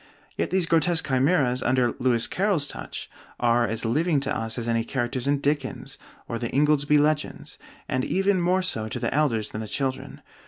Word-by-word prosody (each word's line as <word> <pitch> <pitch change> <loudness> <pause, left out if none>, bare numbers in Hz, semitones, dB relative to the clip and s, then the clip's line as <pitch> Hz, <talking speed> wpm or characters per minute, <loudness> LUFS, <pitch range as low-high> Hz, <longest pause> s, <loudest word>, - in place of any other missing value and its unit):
Yet - - -1
these 185 -2 +1
grotesque 165 +1 +1
chimeras, 130 -1 +2
under 120 -1 +2
Lewis 120 -3 +2
Carroll's 190 -6 +1
touch, - - -7 0.3
are 120 0 +3
as 115 +2 -3
living 150 +6 +1
to 135 - -1
us 115 +1 -2
as 120 -1 -4
any 115 -1 +1
characters 125 +1 -2
in 145 0 +3
Dickens 140 -2 -2 0.3
or 115 - -4
the 120 -1 -3
'Ingoldsby 150 +1 +3
Legends,' 150 0 -1 0.3
and 130 0 -1
even 195 +2 +1
more 185 +2 +2
so 110 -12 0
to - - -4
the - - -2
elders 125 -8 0
than 110 - -5
the 110 - -6
children. 130 +4 -4
135 Hz, 185 wpm, -25 LUFS, 120-155 Hz, 0.3 s, are